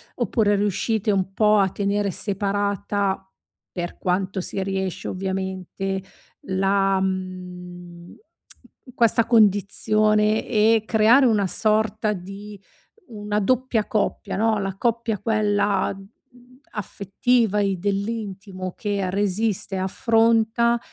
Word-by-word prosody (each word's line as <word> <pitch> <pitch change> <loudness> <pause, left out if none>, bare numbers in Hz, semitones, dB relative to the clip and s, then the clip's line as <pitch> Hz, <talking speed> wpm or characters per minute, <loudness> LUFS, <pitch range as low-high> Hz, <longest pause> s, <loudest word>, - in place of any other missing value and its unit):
Oppure 210 -3 +1
riuscite 210 +2 0
un 190 -1 -1
po' 210 +2 +4
a 195 - +3
tenere 200 +1 -1
separata, 200 0 -1 0.5
per 175 -1 -5
quanto 190 +1 -1
si 195 - -2
riesce 190 -1 -3
ovviamente, 190 0 -4 0.4
la 195 0 +1
mhmm, 180 -2 -6 0.8
questa 230 0 +3
condizione 215 0 +3
e 220 0 +3
creare 225 +5 +5
una 210 -5 +2
sorta 215 +2 +1
di 200 +1 -8 0.5
una 210 -3 -3
doppia 240 0 +1
coppia, 210 -2 -1
no, 220 +1 +2
la 195 -1 -3
coppia 230 -1 -1
quella, 205 -3 +1
mhmm, 245 +5 -19
affettiva 210 +2 0
e 195 -1 +1
dell'intimo 195 -1 -4
che 200 -3 -2
resiste 205 +1 -1
e - - -2
affronta 230 +3 +2
205 Hz, 105 wpm, -23 LUFS, 190-220 Hz, 0.8 s, creare